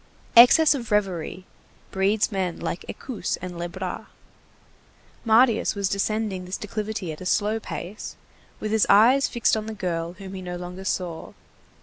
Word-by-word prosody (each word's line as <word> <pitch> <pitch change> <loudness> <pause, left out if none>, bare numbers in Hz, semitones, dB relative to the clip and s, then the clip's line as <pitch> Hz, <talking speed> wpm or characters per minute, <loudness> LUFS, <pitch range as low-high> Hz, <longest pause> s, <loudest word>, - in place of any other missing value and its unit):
Excess 275 +7 +8
of 245 -5 -5
reverie 190 -3 -1 0.5
breeds 200 +3 +1
men 185 -3 -2
like 175 - -4
Escousse 255 -6 -4
and 180 0 -7
Lebras. 170 0 -5 1.2
Marius 230 0 +4
was 200 -1 -1
descending 200 -1 -1
this 185 - -4
declivity 210 -3 -4
at 155 - -9
a - - -7
slow 210 +4 +1
pace, 205 -1 -7 0.4
with 215 - -3
his 220 -1 +3
eyes 245 +7 +6
fixed 235 -2 +1
on 215 0 -4
the 220 - -5
girl 170 -3 -3
whom 190 +1 -10
he 190 - -6
no 180 -1 -5
longer 180 +2 -7
saw. 175 -4 -3
200 Hz, 150 wpm, -24 LUFS, 180-220 Hz, 1.2 s, Excess